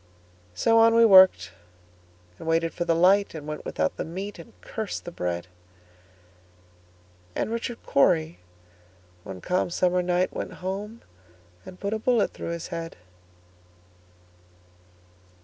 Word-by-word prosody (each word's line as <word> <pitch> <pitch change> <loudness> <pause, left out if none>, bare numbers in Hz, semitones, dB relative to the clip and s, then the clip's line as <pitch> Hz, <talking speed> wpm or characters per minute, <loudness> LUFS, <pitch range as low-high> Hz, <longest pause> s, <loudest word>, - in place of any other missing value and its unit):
So 225 - +3
on 230 0 +5
we 230 0 +6
worked, 185 - +6 0.9
and - - -9
waited 165 0 +1
for 175 - -3
the 165 - +2
light, 190 +3 +3
And 150 -2 -7
went 150 0 -6
without 80 0 -2
the - - -2
meat, 190 +4 -7
and 195 +7 -14
cursed 220 -3 -5
the 175 - -6
bread; 90 - -3 1.9
And - - -2
Richard 235 +1 -4
Cory, 160 +2 +2 0.8
one 95 -2 -9
calm 180 0 0
summer 180 +1 +1
night, 180 +1 0
Went - - -5
home 200 +5 -6 0.6
and 185 - -11
put 200 +1 -3
a 220 - -2
bullet 235 -1 +1
through - - -6
his 170 -1 -5
head. 165 -1 -6
180 Hz, 130 wpm, -25 LUFS, 165-205 Hz, 1.9 s, we